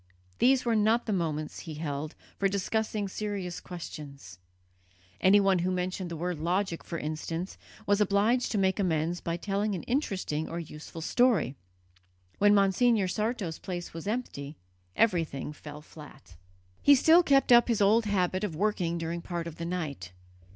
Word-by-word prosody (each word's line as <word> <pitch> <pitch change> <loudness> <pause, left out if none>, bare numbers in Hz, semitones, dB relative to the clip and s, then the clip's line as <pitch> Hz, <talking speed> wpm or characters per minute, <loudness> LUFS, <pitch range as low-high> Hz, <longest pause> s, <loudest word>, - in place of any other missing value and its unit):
These 260 0 +4
were 235 -1 +2
not 220 +3 +3
the 215 - -1
moments, 155 -4 -2
he 160 -3 -7
held, 150 0 -4 0.2
for 195 - +2
discussing 205 +1 -1
serious 195 -3 -4
questions; 140 - -9 0.8
anyone 195 -1 +5
who 180 +2 0
mentioned 185 0 -2
the 170 - -5
word 175 -1 -3
logic, 175 +2 -1
for 170 - -5
instance, 165 +4 -4 0.3
was 205 +1 +2
obliged 210 +5 +2
to 215 - 0
make 190 0 +1
amends 170 -2 0
by 170 0 -2
telling 200 +2 -1
an 175 - -5
interesting 195 - -2
or 165 - -5
useful 160 0 -9
story. 225 - +2 0.8
When 205 0 +5
Monsignor 200 +1 +3
Sarto's 210 -4 -2
place 175 -2 -6
was 165 +3 -7
empty, 160 - -4 0.4
everything 165 - 0
fell 150 0 -10
flat. 140 - -14 0.5
He 285 - +7
still 320 +6 +6
kept 275 -6 +3
up 240 0 +7
his 235 -3 +1
old 215 +3 +4
habit 185 -1 0
of 180 -7 -2
working 180 -3 0
during 170 +1 -3
part 170 -1 -4
of 170 -2 -8
the 170 - -4
night. 150 - -4
185 Hz, 160 wpm, -29 LUFS, 160-210 Hz, 0.8 s, He